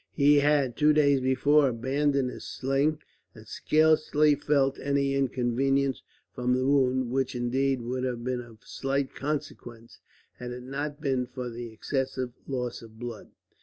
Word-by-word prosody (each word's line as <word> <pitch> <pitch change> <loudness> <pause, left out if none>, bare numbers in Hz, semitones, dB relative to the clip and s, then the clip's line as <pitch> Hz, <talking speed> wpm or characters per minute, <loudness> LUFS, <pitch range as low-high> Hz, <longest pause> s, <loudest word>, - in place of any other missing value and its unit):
He 145 +1 +5
had, 145 -4 +2
two 150 0 +4
days 140 -3 +3
before, 135 +2 +3
abandoned 135 +2 0
his - - -9
sling; 140 +4 -1 0.3
and - - -13
scarcely 155 -1 +3
felt 140 -1 +1
any 140 -1 0
inconvenience 135 +1 0 0.3
from 125 0 0
the 130 0 0
wound, 130 -3 +2
which 135 0 -1
indeed 130 +1 0
would 125 +2 -3
have 125 -2 -3
been 125 0 -2
of 115 -2 -15
slight 135 0 -2
consequence, 135 -5 -6 0.4
had 125 - -6
it 125 0 -8
not 145 +3 -5
been 130 -4 0
for 125 -1 -6
the 120 0 -7
excessive 130 +1 -3
loss 125 -3 -3
of 110 -1 -14
blood. 120 -2 -7
135 Hz, 150 wpm, -27 LUFS, 125-140 Hz, 0.4 s, He